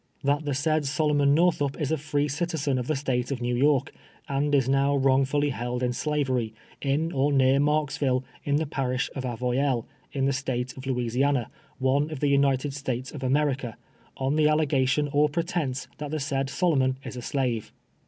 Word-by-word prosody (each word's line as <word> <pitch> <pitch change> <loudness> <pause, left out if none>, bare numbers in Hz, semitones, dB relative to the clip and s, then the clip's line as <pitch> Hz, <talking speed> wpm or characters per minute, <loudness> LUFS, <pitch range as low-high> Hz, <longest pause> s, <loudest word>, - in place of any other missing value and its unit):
That 145 +2 +1
the 145 - -1
sjiid 155 +2 +1
Solomon 145 0 +2
Northup 155 -4 +2
is 150 -2 -1
a - - +3
free 145 0 0
citizen 150 -3 -1
of 125 - -4
the 155 - +1
State 130 -3 -1
of 135 -3 -2
New 120 0 -1
York, 140 +1 +2 0.3
and 145 +1 +1
is 135 -3 +2
now 135 +1 +2
wi 135 -1 +3
ongfuUy 145 +1 +1
held 125 0 -3
in 125 0 +1
slavery, 130 -6 -1 0.3
in 145 +4 0
or 140 0 +1
near 135 0 +4
!Marksville, 145 -3 +1 0.2
in 145 - +1
the 155 +2 +1
parish 130 -2 -2
of 130 -2 -4
Avoyelles, 125 +1 0 0.3
in 135 -1 0
the 140 - +2
State 130 -1 -3
of 130 0 -9
Louisiana, 125 0 0 0.3
one 135 +3 +1
of 155 -4 -6
the 145 - +1
United 140 0 +2
States 130 -2 -4
of 145 - -8
America, 135 -3 0 0.4
on 135 +3 0
the 155 - +4
allegar 145 -4 +2
lion 150 -1 +1
or 150 +1 +4
jjrctence 155 -4 -2
that 150 -1 -4
the 155 +1 -2
said 135 -1 -1
Solomon 135 -3 +1
is - - -7
a 125 - -5
slave. 120 -4 -2
140 Hz, 190 wpm, -26 LUFS, 130-145 Hz, 0.4 s, near